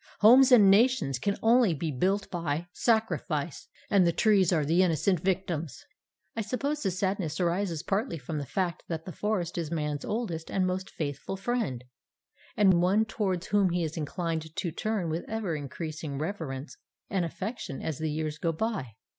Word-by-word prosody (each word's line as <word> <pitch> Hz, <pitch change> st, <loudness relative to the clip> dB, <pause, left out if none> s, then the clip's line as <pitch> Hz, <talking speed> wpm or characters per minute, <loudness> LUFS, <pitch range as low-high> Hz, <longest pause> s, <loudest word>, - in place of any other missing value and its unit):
Homes 255 Hz, +5 st, +8 dB
and 205 Hz, -6 st, +8 dB
nations 200 Hz, -, +3 dB
can 200 Hz, +8 st, -1 dB
only 225 Hz, -5 st, +5 dB
be 155 Hz, +2 st, -2 dB
built 190 Hz, +9 st, 0 dB
by 165 Hz, -2 st, -2 dB
sacrifice, 185 Hz, -, 0 dB, 0.2 s
and 195 Hz, -4 st, +4 dB
the -, -, +4 dB
trees 195 Hz, -1 st, +3 dB
are 155 Hz, -4 st, +2 dB
the 165 Hz, +5 st, +3 dB
innocent 180 Hz, +1 st, +2 dB
victims. 175 Hz, -4 st, -2 dB, 0.5 s
I 225 Hz, -, -1 dB
suppose 275 Hz, +7 st, -2 dB
that -, -, 0 dB
the -, -, +1 dB
sadness 185 Hz, -5 st, -1 dB
arises 175 Hz, -2 st, 0 dB
partly 195 Hz, 0 st, -1 dB
from 150 Hz, +2 st, -4 dB
the 140 Hz, -, -5 dB
fact 180 Hz, 0 st, -1 dB
that 165 Hz, -1 st, -4 dB
the 185 Hz, -, -6 dB
forest 180 Hz, -2 st, -2 dB
is 165 Hz, -3 st, -3 dB
Man's 150 Hz, -3 st, -2 dB
oldest 190 Hz, -8 st, -3 dB
and 190 Hz, -1 st, +1 dB
most 185 Hz, +1 st, -2 dB
faithful 150 Hz, +5 st, -4 dB
friend, 195 Hz, -, -2 dB, 0.7 s
and 190 Hz, -4 st, +5 dB
one 200 Hz, +5 st, +3 dB
towards 190 Hz, -5 st, -2 dB
whom 200 Hz, -2 st, +3 dB
he 175 Hz, 0 st, 0 dB
is 160 Hz, -1 st, -3 dB
inclined 160 Hz, 0 st, -3 dB
to 170 Hz, -, -2 dB
turn 210 Hz, +1 st, -2 dB
with 165 Hz, +2 st, -2 dB
ever 215 Hz, -7 st, -2 dB
increasing 150 Hz, 0 st, -5 dB
reverence 155 Hz, -4 st, -5 dB, 0.3 s
and 190 Hz, -2 st, 0 dB
affection 185 Hz, -, -5 dB
as 155 Hz, -4 st, -3 dB
the 160 Hz, 0 st, -1 dB
years 155 Hz, 0 st, -3 dB
go 165 Hz, -, +1 dB
by. 165 Hz, -, -3 dB
175 Hz, 175 wpm, -28 LUFS, 155-205 Hz, 0.7 s, Homes